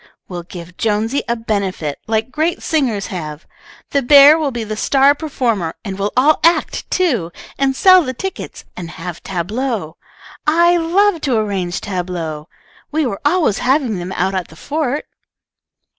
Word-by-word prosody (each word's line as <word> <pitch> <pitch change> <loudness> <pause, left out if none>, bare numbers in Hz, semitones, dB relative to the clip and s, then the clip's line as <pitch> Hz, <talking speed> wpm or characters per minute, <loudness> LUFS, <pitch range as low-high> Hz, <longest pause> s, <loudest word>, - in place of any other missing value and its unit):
We'll 175 -2 -6
give 170 0 -11
Jonesy 225 +5 0
a 235 - +2
benefit, 195 -9 -2
like 220 +2 -1
great 315 +5 -1
singers 250 -11 0
have. 155 -3 -6 0.5
The 280 - +2
bear 280 +3 +8
will 310 -3 0
be 240 -3 -4
the 215 0 -4
star 275 +5 +4
performer, 240 - -2
and 195 -1 -5
we'll 200 +1 -1
all 295 +4 +4
act, 335 +1 +2
too, 245 - 0 0.3
and 270 -1 +1
sell 370 +4 +7
the 255 -3 -4
tickets, 385 +9 -6
and 170 -2 -7
have 170 0 -7
tableaux. 195 -1 -3 0.5
I 340 +3 +4
love 345 +2 +2
to 260 -5 +1
arrange 195 -4 -2
tableaux. 175 -5 -4 0.4
We 310 0 +1
were 200 -6 -3
always 300 - +2
having 255 -6 +1
them 175 +1 -5
out 190 +2 0
at 185 -3 -2
the 160 - -16
fort." 290 - -2
225 Hz, 160 wpm, -18 LUFS, 185-290 Hz, 0.5 s, bear